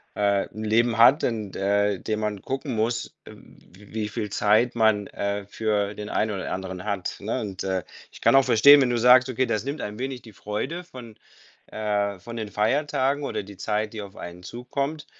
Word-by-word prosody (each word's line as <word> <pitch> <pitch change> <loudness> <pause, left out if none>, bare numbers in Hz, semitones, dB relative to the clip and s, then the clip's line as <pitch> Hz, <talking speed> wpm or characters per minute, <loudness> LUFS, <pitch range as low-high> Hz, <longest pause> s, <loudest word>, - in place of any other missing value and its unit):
äh, 100 -1 +1
'n 110 +1 -7
Leben 115 +1 +2
hat, 130 +7 +6
in, 110 -5 -2
äh, 100 0 +1
dem 110 0 -2
man 105 -2 -3
gucken 135 -2 -4
muss, 120 +2 -1
w 100 +4 -16
wie 105 -1 -2
viel 105 -1 -4
Zeit 110 +4 +2
man, 110 -3 +3
äh, 100 0 -3
für 105 -2 -1
den 105 0 -7
einen 110 0 0
oder 95 -2 -4
anderen 95 0 -5
hat, 100 -3 -3
ne? 110 +5 -2
Und, 95 -4 -5
äh, 95 -1 -1 0.3
ich - - -14
kann - - +5
auch 135 - +7
verstehen, 140 +4 +7
wenn 125 - +2
du 120 - +1
sagst: 125 +2 +6
„Okay, 130 +1 0
das 110 -2 -1
nimmt 140 +3 -4
ein 105 +1 -5
wenig 130 -1 -4
die 110 -3 -14
Freude 120 - -4
von, 125 -9 -12 0.5
äh 105 -2 -1
von 115 +5 -9
den 110 -2 -4
Feiertagen 140 +5 0
oder 120 - -3
die 100 0 -12
Zeit, 105 +2 -2
die 110 - -5
auf 100 0 -10
einen 85 +1 -8
zukommt.“ 140 - -4
110 Hz, 200 wpm, -25 LUFS, 100-125 Hz, 0.5 s, auch